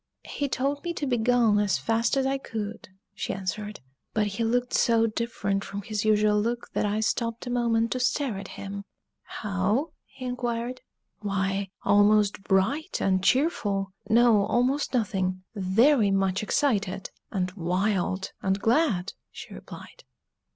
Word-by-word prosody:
"He 285 -1 -3
told 280 +3 -1
me 345 -1 -3
to 290 - -2
begone 240 -3 +3
as 205 -2 +2
fast 230 +4 +1
as 265 - +2
I 270 0 0
could," 220 -6 -6 0.2
she - - -3
answered. 205 +2 -4 0.3
"But 215 -1 +2
he 205 +3 -2
looked 245 +2 0
so 230 -1 +4
different 215 -3 -2
from 200 0 -6
his 210 0 -2
usual 210 -1 +3
look 235 +2 -3
that - - +1
I 210 +1 0
stopped 230 +1 -1
a 245 - -4
moment 230 -2 +1
to 255 - -1
stare 250 -4 0
at 195 - -8
him." 200 0 -6 0.4
"How?" 205 +8 -1 0.2
he 260 -1 -10
inquired. 245 0 -3 0.4
"Why, 195 -1 -1
almost 205 0 +4
bright 210 - 0
and 185 -1 +1
cheerful 205 - +1 0.2
no, 230 -2 +5
almost 260 +3 +1
nothing 190 -5 -1
very 215 +4 +3
much 195 -1 +1
excited, 200 -6 0 0.2
and 185 -2 -1
wild, 190 +1 -1
and 195 +1 0
glad!" 225 - +1 0.2
she - - -10
replied. - - -11
215 Hz, 145 wpm, -27 LUFS, 195-245 Hz, 0.4 s, no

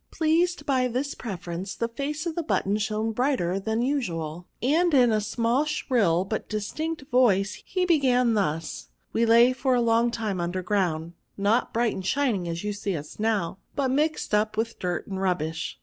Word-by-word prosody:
*' - - -47
Pleased 325 0 +1
by 260 -3 +2
this 255 +4 -2
preference, 185 -3 -5
the 230 - -1
face 285 +6 -4
of 335 - -2
the 340 - -2
button 205 -10 0
shone 215 +1 -1
brighter 220 -7 0
than 220 +3 -1
usual, 175 - -2
and 320 +5 +2
in 245 -3 +5
a 215 -1 +2
small 230 +5 +1
shrill, 225 - +1
but 215 +2 -4
distinct 285 +10 -3
voice, 200 -6 +3
he 370 -1 0
began 255 -8 +3
thus: 165 - -2
— - - -47
" - - -44
We 230 +1 +2
lay 235 +2 +6
for 260 0 +1
a - - +3
long 230 0 +3
time 220 -5 -2
imder 175 +1 -3
ground; 175 -5 0 0.2
not 205 +4 +1
bright 235 -1 +1
and 190 - -5
shining 220 -6 0
as 170 +2 -4
you 210 - -1
now - - -5
see 195 -4 -2
us, 195 +4 -2 0.2
but 270 -2 0
mixed 300 -2 0
up 215 +1 +1
with 225 +1 -2
dirt 180 -2 -2
and 190 -1 -5
rubbish. 160 -4 -2
225 Hz, 195 wpm, -26 LUFS, 190-260 Hz, 0.2 s, lay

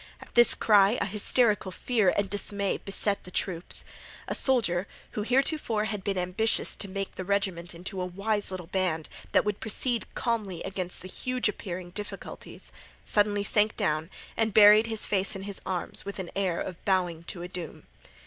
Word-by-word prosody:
At - - -14
this 240 0 +8
cry 205 +1 +5
a - - +1
hysterical 210 +1 +2
fear 215 0 +2
and 205 -1 +1
dismay 200 0 -2
beset 200 0 0
the - - -10
troops. 180 -1 -2 0.4
A - - -2
soldier, 205 -8 +2 0.2
who 210 - -3
heretofore 250 -1 +1
had 210 -3 -4
been 195 -1 -1
ambitious 180 +5 +1
to 200 - -4
make 195 0 -4
the 185 - -5
regiment 185 -3 -1
into 185 +2 -5
a - - -1
wise 205 +3 -1
little 185 -2 -6
band 175 -3 -1 0.2
that - - +4
would 210 -1 -1
proceed 230 +2 0
calmly 215 -8 -2
amid 185 -2 -3
the 185 - -3
huge 255 +6 -1
appearing 180 -3 -5
difficulties, 205 +3 -7 0.3
suddenly 205 -1 +2
sank 210 +1 +2
down 155 +2 0 0.3
and 220 -3 0
buried 215 +1 +8
his 220 -1 -2
face 195 0 0
in 195 - -6
his 200 -1 -4
arms 180 -2 -2
with 200 0 -6
an 190 -3 -5
air 190 -3 0
of 180 -2 -6
bowing 180 -4 +1
to 175 0 -5
a - - -4
doom. 180 -3 -7
200 Hz, 175 wpm, -28 LUFS, 180-215 Hz, 0.4 s, this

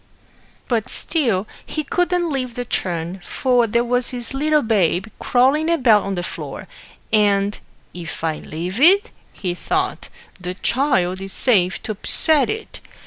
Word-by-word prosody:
But 230 -4 -1
still 230 - +1 0.2
he 310 - -4
couldn't 355 +1 0
leave 255 -4 -3
the 245 - -4
churn, 175 -3 -3
for 245 +3 +1
there 235 +2 +1
was 245 0 0
his 245 -1 -3
little 300 +2 +2
babe 195 -5 +1
crawling 275 +6 +2
about 250 -11 +4
on 195 0 -3
the 175 - -3
floor, - - -7 0.5
and 205 -1 +2 0.3
"if 170 -2 -8
I 160 -1 -1
leave 175 +7 -5
it," 395 +8 +5 0.2
he 180 -3 -4
thought, 180 - -2 0.3
"the 180 0 -5
child 190 -7 0
is 195 0 -7
safe 190 -7 +1
to - - -3
upset 285 - +3
it." 440 +1 -5
230 Hz, 145 wpm, -20 LUFS, 185-275 Hz, 0.5 s, it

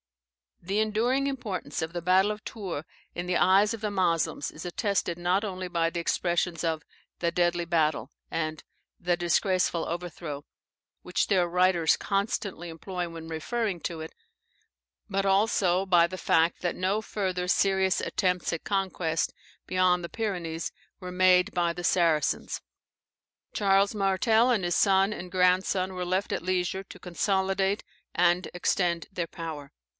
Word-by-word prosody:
The 195 +4 -1
enduring 230 +6 +1
importance 210 - -4
of 160 +1 -4
the 175 - -3
battle 190 +3 +4
of 210 0 -7
Tours 185 -9 -5 0.3
in 175 - -3
the 180 -1 +2
eyes 200 +4 +4
of 225 - -6
the 210 -1 -1
Moslems, 170 -6 0
is 160 - -9
attested 180 -2 -1
not 180 +3 +1
only 185 -3 -4
by 170 -2 +1
the 170 - -4
expressions 170 0 0
of 160 -2 -1 0.4
"the 170 -1 +1
deadly 175 0 +1
battle," 160 -2 0 0.2
and 155 -1 -3 0.4
"the 175 0 +1
disgraceful 175 0 +1
overthrow," 165 -4 -5 0.6
which - - 0
their 185 -4 +3
writers 180 -1 +3
constantly 195 -3 -2
employ 175 +2 -5
when 165 -1 -8
referring 180 +5 -2
to 165 -3 -4
it, 160 - -8 1.0
but 195 -1 0
also 195 -2 +2
by 175 -3 +5
the 185 +2 -7
fact 165 -1 +2
that 175 -2 -1
no 190 +4 0
further 185 -4 -2
serious 190 0 +2
attempts 180 -2 0
at 165 - -4
conquest 185 -5 -1 0.3
beyond 185 -1 +2
the 170 - -5
Pyrenees 175 -7 -3 0.3
were 180 -2 -7
made 185 +1 +4
by 175 -1 +1
the 175 - -7
Saracens. 165 -5 +1 0.9
Charles 195 0 +3
Martel, 220 +4 +3
and 220 -6 +1
his 175 0 0
son 195 0 +4
and 180 -3 -6
grandson, 185 0 +2
were 180 -1 -3
left 185 +3 -1
at - - -2
leisure 185 +1 -1
to - - -13
consolidate 190 +2 0 0.3
and 175 +1 +3
extend 175 -1 0
their 175 -3 -3
power. 160 -4 -7
180 Hz, 150 wpm, -28 LUFS, 170-195 Hz, 1.0 s, by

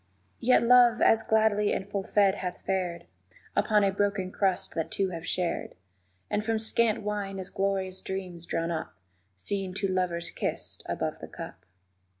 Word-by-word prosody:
Yet 250 +1 +4
Love 240 0 +6
as 225 - +5
gladly 215 -2 +3
and 195 - -3
full 200 -1 -2
fed 200 -1 +3
hath 180 -2 -5
fared 180 -3 -1 0.5
Upon 210 0 +3
a 195 - +3
broken 195 -1 0
crust 190 -2 0
that 165 - -2
two 195 -1 0
have 165 -2 -6
shared; 180 -1 -1 0.5
And 210 0 -1
from 225 0 +1
scant 220 0 +1
wine 205 -2 -3
as 190 0 -6
glorious 190 -1 -1
dreams 180 -3 -5
drawn 165 +1 -1
up 160 -1 -4 0.4
_Seeing 190 - -2
two 195 0 0
lovers 175 -2 -1
kissed - - -4
above - - -2
the - - -8
cup. - - -9
195 Hz, 160 wpm, -28 LUFS, 185-210 Hz, 0.5 s, Love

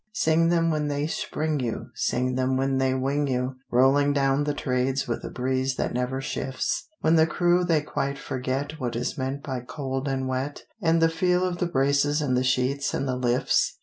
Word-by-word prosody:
Sing 165 -4 +3
them 165 -1 +2
when 150 -1 0
they 145 0 -1
spring 155 -1 -2
you, 120 -1 -4
Sing 125 +1 0
them 130 +1 +1
when 135 0 +1
they 130 0 +2
wing 140 +2 0
you, 130 0 -1
Rolling 135 +3 +4
down 140 0 +2
the 145 - 0
Trades 130 0 0
with 120 - -3
a - - -5
breeze 130 +1 -1
that - - -2
never 125 +2 -1
shifts; 135 - -2
When 160 +1 +4
the 160 0 +5
crew 175 +1 +2
they 165 -3 +2
quite 140 -2 -2
forget 135 +4 -3
What 120 -3 -3
is 120 +5 -2
meant 135 0 -3
by 130 -3 -3
cold 135 +1 -4
and 135 -1 -1
wet, 130 +3 -3 0.2
And 165 -2 +3
the - - +7
feel 180 +2 +1
of 175 -1 -2
the 175 - +1
braces 140 0 +2
and 140 -4 0
the 125 - +2
sheets 130 +2 0
and 135 - -1
the 130 - 0
lifts. 125 0 +1
135 Hz, 205 wpm, -26 LUFS, 130-150 Hz, 0.2 s, the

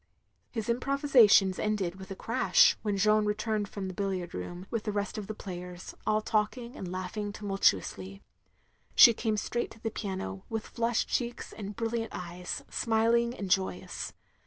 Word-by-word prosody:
His 225 -3 -4
improvisations 240 -6 +4
ended 195 -4 -1
with 190 - -9
a 195 - -5
crash, 470 - +4
when 205 -2 -1
Jeanne 215 +1 +3
returned 210 0 -1
from 195 -2 -5
the 185 - -5
billiard 185 -2 -3
room, 175 - -6
with 230 - -1
the 210 - -2
rest 205 0 -2
of 205 - -7
the 215 - -5
players, 180 -2 -7
aU 215 0 +3
talking 230 +3 -1
and 180 -2 -6
laughing 185 +3 -4
tumtdtuously. 100 - 0 0.7
She 235 - +10
came 220 -1 -1
straight 240 +3 -2
to - - -15
the 225 0 -3
piano, 190 -2 -4
with 225 -1 -3
flushed 235 0 0
cheeks 240 -1 -2
and 205 -1 -7
brilliant 230 0 -2
eyes, 180 0 -5
smiling 235 +1 +2
and 195 -5 -5
joyous. 190 0 -1
210 Hz, 160 wpm, -30 LUFS, 190-230 Hz, 0.7 s, She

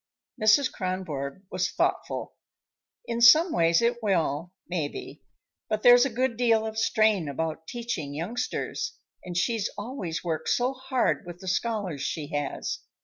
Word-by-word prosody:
Mrs. 220 +6 +5
Kronborg 185 -5 -4
was 185 -1 0
thoughtful. - - -1 0.7
"In 235 0 -3
some 310 +9 +7
ways 165 +3 +3
it 240 +1 +1
will, 170 -5 0 0.2
maybe. 160 -5 -4 0.5
But 215 -1 -1
there's 245 +1 +8
a - - 0
good 245 0 -1
deal 225 -2 +3
of 220 0 -3
strain 215 -8 +2
about 160 +2 -4
teaching 230 -13 -4
youngsters, 245 - -3 0.3
and 175 -1 -5
she's 225 +2 0
always 205 -7 -4
worked 165 -3 -2
so 250 +2 +1
hard 260 -1 0
with 175 -1 -7
the 190 - -11
scholars 190 -6 -1
she 150 -1 -3
has. 145 -1 -3
205 Hz, 145 wpm, -27 LUFS, 165-235 Hz, 0.7 s, there's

